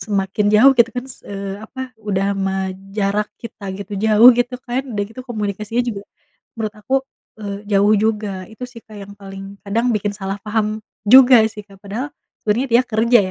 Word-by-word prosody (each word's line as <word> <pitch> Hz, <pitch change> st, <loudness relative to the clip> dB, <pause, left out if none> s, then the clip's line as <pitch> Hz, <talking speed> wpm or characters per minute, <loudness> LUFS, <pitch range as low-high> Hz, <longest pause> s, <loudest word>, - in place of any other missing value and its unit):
semakin 205 Hz, 0 st, -1 dB
jauh 260 Hz, +6 st, +7 dB
gitu 235 Hz, 0 st, +5 dB
kan 245 Hz, -, -2 dB
s 265 Hz, -2 st, -11 dB
eee, 200 Hz, 0 st, -5 dB
apa 260 Hz, +4 st, -10 dB, 0.2 s
udah 200 Hz, -2 st, 0 dB
mah 190 Hz, -1 st, -2 dB, 0.2 s
jarak 205 Hz, +1 st, 0 dB
kita 230 Hz, -3 st, -9 dB
gitu, 200 Hz, +1 st, -8 dB
jauh 220 Hz, +2 st, +8 dB
gitu 245 Hz, +1 st, 0 dB
kan, 245 Hz, +1 st, 0 dB
udah 205 Hz, -1 st, -1 dB
gitu 225 Hz, +3 st, -10 dB
komunikasinya 215 Hz, +1 st, -2 dB
juga 200 Hz, -4 st, -4 dB, 0.5 s
menurut 215 Hz, -2 st, -3 dB
aku, 260 Hz, +5 st, -2 dB, 0.5 s
eee, 200 Hz, -1 st, -5 dB
jauh 205 Hz, +1 st, +4 dB
juga. 210 Hz, -4 st, -2 dB
Itu 235 Hz, +3 st, -7 dB
sih 245 Hz, -2 st, -11 dB
Kak 215 Hz, -1 st, -13 dB
yang 200 Hz, +1 st, -10 dB
paling 195 Hz, 0 st, -9 dB
kadang 225 Hz, +4 st, 0 dB
bikin 205 Hz, -1 st, -1 dB
salah 195 Hz, -1 st, -4 dB
paham 215 Hz, 0 st, -1 dB, 0.2 s
juga 250 Hz, +1 st, +8 dB
sih 215 Hz, -, -8 dB
Kak. 195 Hz, -2 st, -18 dB
Padahal, 225 Hz, +8 st, -4 dB, 0.4 s
sebenarnya 235 Hz, +6 st, +1 dB
dia 240 Hz, +2 st, +6 dB
kerja 230 Hz, +2 st, +4 dB
210 Hz, 180 wpm, -19 LUFS, 200-230 Hz, 0.5 s, jauh